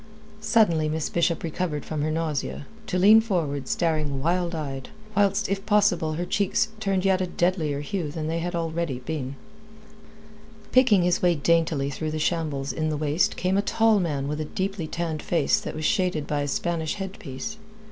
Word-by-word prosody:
Suddenly 215 Hz, -8 st, +3 dB
Miss 155 Hz, 0 st, -2 dB
Bishop 170 Hz, -1 st, +1 dB
recovered 160 Hz, -2 st, -3 dB
from 155 Hz, -2 st, -3 dB
her 155 Hz, -, 0 dB
nausea, 155 Hz, -3 st, -2 dB, 0.2 s
to 185 Hz, -, -1 dB
lean 210 Hz, +4 st, +7 dB
forward 155 Hz, -, -2 dB
staring 155 Hz, -5 st, 0 dB
wild 170 Hz, +3 st, 0 dB
eyed, 135 Hz, -4 st, -5 dB, 0.3 s
whilst 205 Hz, +1 st, +2 dB
if 195 Hz, 0 st, -2 dB
possible 200 Hz, -7 st, +3 dB
her 175 Hz, +3 st, -2 dB
cheeks 200 Hz, +3 st, +1 dB
turned 195 Hz, -3 st, 0 dB
yet 190 Hz, -1 st, +3 dB
a 185 Hz, -, 0 dB
deadlier 175 Hz, -5 st, 0 dB
hue 160 Hz, +1 st, -3 dB
than 155 Hz, +1 st, -4 dB
they 165 Hz, +1 st, -1 dB
had 175 Hz, +2 st, -3 dB
been 170 Hz, -, 0 dB
already. 165 Hz, -6 st, -3 dB, 1.7 s
Picking 245 Hz, -8 st, +5 dB
his 175 Hz, 0 st, +2 dB
way 175 Hz, -1 st, +4 dB
daintily 155 Hz, -2 st, +1 dB
through 155 Hz, +3 st, -3 dB
that 155 Hz, 0 st, -3 dB
shambles 150 Hz, -4 st, -1 dB
in 155 Hz, -1 st, -1 dB
the 155 Hz, -, -1 dB
waist 150 Hz, +3 st, +1 dB
came 185 Hz, +2 st, +1 dB
a -, -, +4 dB
tall 220 Hz, 0 st, +3 dB
man 145 Hz, -6 st, -1 dB
with 150 Hz, +1 st, -2 dB
a -, -, -2 dB
deeply 190 Hz, 0 st, -3 dB
tanned 165 Hz, -2 st, -3 dB
face 165 Hz, -5 st, +2 dB
that -, -, -6 dB
was 155 Hz, 0 st, -3 dB
shaded 180 Hz, -7 st, +1 dB
by 145 Hz, 0 st, -1 dB
a 145 Hz, -, -1 dB
Spanish 160 Hz, +3 st, -1 dB
headpiece. 195 Hz, 0 st, -6 dB
165 Hz, 180 wpm, -25 LUFS, 155-190 Hz, 1.7 s, lean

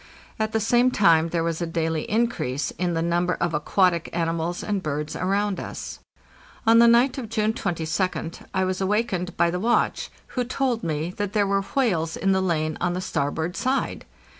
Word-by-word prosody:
At 220 Hz, 0 st, 0 dB
the 220 Hz, -, +1 dB
same 240 Hz, +3 st, +3 dB
time 170 Hz, -8 st, +4 dB
there 165 Hz, 0 st, 0 dB
was 165 Hz, 0 st, -2 dB
a 170 Hz, -, -1 dB
daily 165 Hz, -1 st, -2 dB
increase 210 Hz, -, 0 dB
in 175 Hz, -1 st, -2 dB
the 165 Hz, -, 0 dB
number 175 Hz, +1 st, +1 dB
of 170 Hz, -1 st, -1 dB
aquatic 170 Hz, +3 st, +1 dB
animals 170 Hz, +1 st, -1 dB
and 205 Hz, -2 st, -1 dB
birds 150 Hz, -1 st, -3 dB
around 200 Hz, +2 st, 0 dB
us. -, -, -7 dB, 0.7 s
On 225 Hz, +1 st, +6 dB
the 235 Hz, -, +7 dB
night 245 Hz, +3 st, +4 dB
of 235 Hz, -4 st, -6 dB
June 215 Hz, 0 st, +1 dB
22d 170 Hz, -2 st, -2 dB
I 190 Hz, -1 st, +1 dB
was 185 Hz, 0 st, -2 dB
awakened 190 Hz, -3 st, -1 dB
by 170 Hz, 0 st, +3 dB
the 180 Hz, -, -2 dB
watch, 235 Hz, +5 st, +1 dB, 0.2 s
who 250 Hz, -, -1 dB
told 250 Hz, -1 st, -1 dB
me 160 Hz, +1 st, -2 dB
that 205 Hz, -1 st, -2 dB
there 210 Hz, -2 st, +3 dB
were 195 Hz, 0 st, +1 dB
whales 190 Hz, -9 st, 0 dB
in 195 Hz, -, +1 dB
the 190 Hz, 0 st, +2 dB
lane 155 Hz, -4 st, -1 dB
on 175 Hz, 0 st, +1 dB
the 180 Hz, -, -2 dB
starboard 160 Hz, +1 st, -2 dB
side. 265 Hz, +2 st, -1 dB
185 Hz, 190 wpm, -24 LUFS, 165-215 Hz, 0.7 s, the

